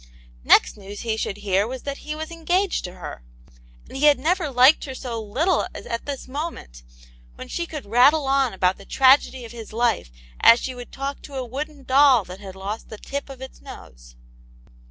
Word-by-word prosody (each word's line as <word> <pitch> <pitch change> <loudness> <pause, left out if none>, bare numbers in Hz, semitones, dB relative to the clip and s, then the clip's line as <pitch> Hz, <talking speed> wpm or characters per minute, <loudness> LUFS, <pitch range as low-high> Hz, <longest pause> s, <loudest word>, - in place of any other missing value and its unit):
Next - - +4
news 200 0 -9
he 225 -2 -1
should 205 -2 -3
hear 200 0 0
was 255 +1 -7
that 280 -1 -5
he 305 0 -6
was 315 +1 -6
engaged 350 +4 0
to 180 - -7
her. 180 - -8 0.7
And - - -12
he 275 +3 +1
had 290 - +6
never 320 +3 0
liked 260 +5 +5
her 265 -2 -7
so 235 -3 -5
little 265 - 0
as - - -8
at 230 +3 -5
this 275 -2 -5
moment, 260 - -6 0.5
when - - -9
she 340 -1 -4
could 300 -7 -7
rattle 260 +8 +4
on 270 -2 +2
about 185 0 +1
the 200 - -13
tragedy 260 0 +3
of 225 - -10
his 230 -2 -10
life 230 - 0 0.3
as 235 - +7
she 260 - -4
would 245 -1 -10
talk 275 +1 -5
to 285 - -11
a 260 -1 -3
wooden 285 +3 -6
doll 265 -3 +5
that 185 +1 -10
had 195 -2 -10
lost 200 +3 -6
the 215 - -8
tip 280 +6 -6
of 265 -1 -10
its 265 - -11
nose. - - -13
260 Hz, 205 wpm, -23 LUFS, 215-285 Hz, 0.7 s, as